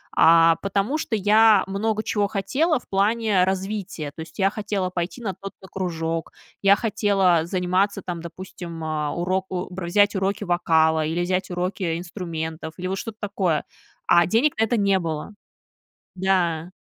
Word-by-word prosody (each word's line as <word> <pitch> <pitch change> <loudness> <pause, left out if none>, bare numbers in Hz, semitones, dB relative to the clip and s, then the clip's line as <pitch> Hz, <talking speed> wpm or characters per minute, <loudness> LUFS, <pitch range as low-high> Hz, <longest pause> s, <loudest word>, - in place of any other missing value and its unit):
А 165 0 +6
потому, 200 +8 -1
что 260 -7 -2
я 210 0 +5
много 215 +2 -1
чего 205 -2 0
хотела 265 - 0
в - - -23
плане 205 -1 +2
развития. 190 -5 -3
То - - -15
есть 160 -1 -11
я 195 0 +4
хотела 205 -3 -2
пойти 180 +6 -4
на 200 -4 -3
тот-то 195 +1 -11
кружок. 165 -3 -3 0.3
Я 200 0 +6
хотела 200 -5 +2
заниматься 185 +3 0
там, 175 -2 -5
допустим, 170 -1 -8
о, 155 -2 -2
уроку 185 +1 -2
бр 180 -1 -5
взять 205 +4 +3
уроки 195 +2 -1
вокала 160 -3 +2
или 165 +3 -1
взять 185 +1 -1
уроки 180 -1 -2
инструментов. 160 -3 -5
Или 185 +1 -4
вот 190 - -2
что-то 225 -2 -7
такое. 190 -6 0 0.5
А 170 0 +6
денег 230 - +2
на 220 - +3
это 225 +1 +1
не 200 -1 +3
было. 160 +3 -4 0.8
Да. 180 -3 0
190 Hz, 155 wpm, -23 LUFS, 170-205 Hz, 0.8 s, А